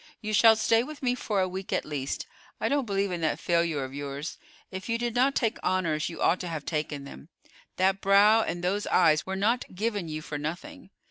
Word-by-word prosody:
You 215 Hz, 0 st, -4 dB
shall 225 Hz, +1 st, +7 dB
stay 225 Hz, +1 st, +3 dB
with 285 Hz, +3 st, -8 dB
me 250 Hz, -1 st, +2 dB
for 215 Hz, -5 st, -1 dB
a 185 Hz, -, +1 dB
week 185 Hz, +1 st, -6 dB
at -, -, 0 dB
least. 140 Hz, -3 st, -4 dB, 0.3 s
I -, -, 0 dB
don't 280 Hz, -3 st, 0 dB
believe 200 Hz, -1 st, 0 dB
in 175 Hz, -1 st, -3 dB
that 160 Hz, -, 0 dB
failure 170 Hz, -4 st, 0 dB
of 130 Hz, 0 st, -7 dB
yours. 145 Hz, +1 st, -5 dB, 0.3 s
If 190 Hz, +3 st, -7 dB
you 230 Hz, -, +1 dB
did 240 Hz, -1 st, -2 dB
not 260 Hz, +3 st, +2 dB
take 225 Hz, -3 st, 0 dB
honors, 170 Hz, -5 st, 0 dB
you 165 Hz, -, -9 dB
ought 180 Hz, -, +3 dB
to 180 Hz, -, -5 dB
have 160 Hz, -4 st, -5 dB
taken 150 Hz, -3 st, -3 dB
them. 140 Hz, +2 st, -11 dB, 0.5 s
That 190 Hz, +1 st, +1 dB
brow 205 Hz, +3 st, +6 dB
and 175 Hz, -5 st, -3 dB
those 200 Hz, +3 st, -1 dB
eyes 155 Hz, 0 st, +3 dB
were 190 Hz, -, -2 dB
not 215 Hz, +1 st, 0 dB
given 205 Hz, -3 st, -2 dB
you 155 Hz, 0 st, -5 dB
for 145 Hz, -1 st, -5 dB
nothing. 195 Hz, -, -6 dB
190 Hz, 220 wpm, -27 LUFS, 155-225 Hz, 0.5 s, shall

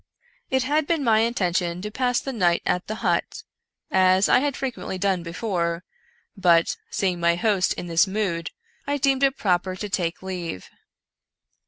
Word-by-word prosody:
It 260 Hz, -1 st, +1 dB
had 290 Hz, +2 st, +1 dB
been 330 Hz, -4 st, 0 dB
my 225 Hz, -3 st, +4 dB
intention 180 Hz, -6 st, 0 dB
to 210 Hz, -, -4 dB
pass 245 Hz, +1 st, +1 dB
the 270 Hz, -, -5 dB
night 175 Hz, -6 st, +2 dB
at 180 Hz, -, 0 dB
the 215 Hz, -, -3 dB
hut, -, -, 0 dB, 0.5 s
as 185 Hz, +1 st, +4 dB
I -, -, +5 dB
had 285 Hz, 0 st, -1 dB
frequently 255 Hz, -7 st, -4 dB
done 190 Hz, -1 st, 0 dB
before, 170 Hz, -1 st, -2 dB, 0.5 s
but, 175 Hz, -4 st, +3 dB
see 195 Hz, -, 0 dB
ing 175 Hz, -1 st, -4 dB
my 170 Hz, 0 st, +3 dB
host 195 Hz, 0 st, +1 dB
in -, -, -6 dB
this 170 Hz, +2 st, +3 dB
mood, 190 Hz, -5 st, -2 dB, 0.4 s
I 285 Hz, 0 st, 0 dB
deemed 270 Hz, -1 st, +1 dB
it 275 Hz, -1 st, +2 dB
proper 185 Hz, -1 st, 0 dB
to 205 Hz, +2 st, -5 dB
take 175 Hz, -2 st, -2 dB
leave. 175 Hz, -, -6 dB
190 Hz, 170 wpm, -24 LUFS, 175-240 Hz, 0.5 s, I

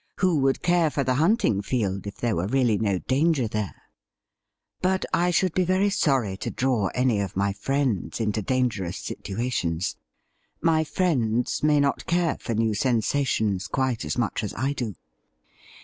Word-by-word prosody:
Who 180 Hz, -5 st, +2 dB
would 135 Hz, 0 st, +1 dB
care 175 Hz, -2 st, +3 dB
for 140 Hz, -1 st, -1 dB
the 130 Hz, 0 st, +1 dB
hunting 165 Hz, -, +2 dB
field 100 Hz, -4 st, -2 dB
if 100 Hz, -, -6 dB
there 115 Hz, -3 st, 0 dB
were 85 Hz, +3 st, -1 dB
really 120 Hz, -3 st, +2 dB
no 100 Hz, -4 st, +1 dB
danger 135 Hz, -, +1 dB
there? 105 Hz, -3 st, -4 dB, 1.0 s
But 190 Hz, +1 st, +1 dB
I 175 Hz, +1 st, +3 dB
should 180 Hz, 0 st, +2 dB
be 185 Hz, -, +2 dB
very 185 Hz, +3 st, +2 dB
sorry 130 Hz, -, +1 dB
to -, -, -4 dB
draw 125 Hz, -6 st, 0 dB
any 125 Hz, -4 st, +2 dB
of 100 Hz, -3 st, -3 dB
my 100 Hz, 0 st, +1 dB
friends 130 Hz, -1 st, -1 dB
into 110 Hz, -1 st, 0 dB
dangerous 110 Hz, -7 st, -1 dB
situations. 95 Hz, -5 st, -3 dB, 0.6 s
My 160 Hz, -1 st, +3 dB
friends 125 Hz, -, 0 dB
may 150 Hz, -1 st, +4 dB
not 140 Hz, 0 st, 0 dB
care 170 Hz, -1 st, +1 dB
for 115 Hz, -, -3 dB
new 110 Hz, 0 st, +1 dB
sensations 110 Hz, -3 st, 0 dB
quite 130 Hz, -3 st, -1 dB
as -, -, -3 dB
much 115 Hz, -2 st, -1 dB
as 105 Hz, -, -4 dB
I 135 Hz, +5 st, -1 dB
do.' 115 Hz, -8 st, -4 dB
125 Hz, 165 wpm, -25 LUFS, 105-150 Hz, 1.0 s, may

